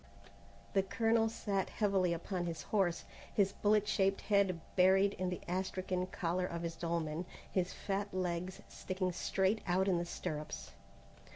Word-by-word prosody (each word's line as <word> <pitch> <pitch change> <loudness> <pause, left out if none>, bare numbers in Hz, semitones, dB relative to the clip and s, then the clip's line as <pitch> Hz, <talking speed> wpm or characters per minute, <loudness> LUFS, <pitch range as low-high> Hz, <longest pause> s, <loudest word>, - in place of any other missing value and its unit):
The 195 - +5
colonel 225 +3 +2
sat 200 -3 -1
heavily 195 -4 +2
upon 175 +1 -2
his 165 -1 -4
horse, 190 -5 +1 0.3
his 195 -2 +3
bullet 210 0 +2
shaped 195 -2 +2
head 200 -4 +2 0.2
buried 190 +2 +5
in 185 0 -2
the 180 - -4
astrakan 185 0 -1
collar 180 +2 0
of 170 -1 -4
his 165 -1 -3
dolman, 165 0 -2 0.2
his 180 -1 +1
fat 200 +1 -2
legs 180 0 -2
sticking 185 -1 -2
straight 190 +4 +1
out 185 +2 +2
in 180 -3 +3
the 175 - -2
stirrups. 155 -3 -5
185 Hz, 150 wpm, -35 LUFS, 175-195 Hz, 0.3 s, The